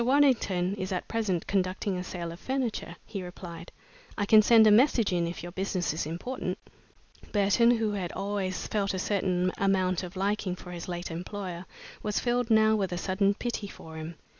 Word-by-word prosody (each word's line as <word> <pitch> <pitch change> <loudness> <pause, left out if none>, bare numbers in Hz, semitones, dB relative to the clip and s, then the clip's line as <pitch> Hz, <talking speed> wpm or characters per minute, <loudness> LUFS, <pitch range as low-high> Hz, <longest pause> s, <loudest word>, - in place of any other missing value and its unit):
Waddington 235 -9 +3
is 185 +1 -3
at 180 - -2
present 210 -7 -1
conducting 190 0 0
a 180 - -3
sale 175 -2 -5
of 170 - -10
furniture," 250 -10 -2
he 195 - -5
replied. 180 -1 -9 0.5
"I 205 - +1
can 215 +1 +7
send 225 0 +7
a 215 - +7
message 230 -3 +4
in 170 -1 +1
if 170 0 -6
your 175 - -6
business 185 -3 -1
is 155 -1 -2
important." 175 +11 -4 0.7
Burton, 205 +3 +4
who 225 -3 +2
had 190 -4 -3
always 195 -2 -2
felt 200 -2 -1
a - - -2
certain 185 -2 +1
amount 185 -2 +2
of 180 0 -8
liking 195 -1 -1
for 180 0 -10
his 175 -1 -6
late 175 -1 -4
employer, 180 +1 -5 0.3
was 210 -1 -1
filled 245 -1 0
now 220 -1 +5
with 195 -4 -1
a 175 - -2
sudden 195 +2 +1
pity 230 -2 -3
for 160 -4 -11
him. 160 +1 -6
195 Hz, 190 wpm, -28 LUFS, 180-215 Hz, 0.7 s, can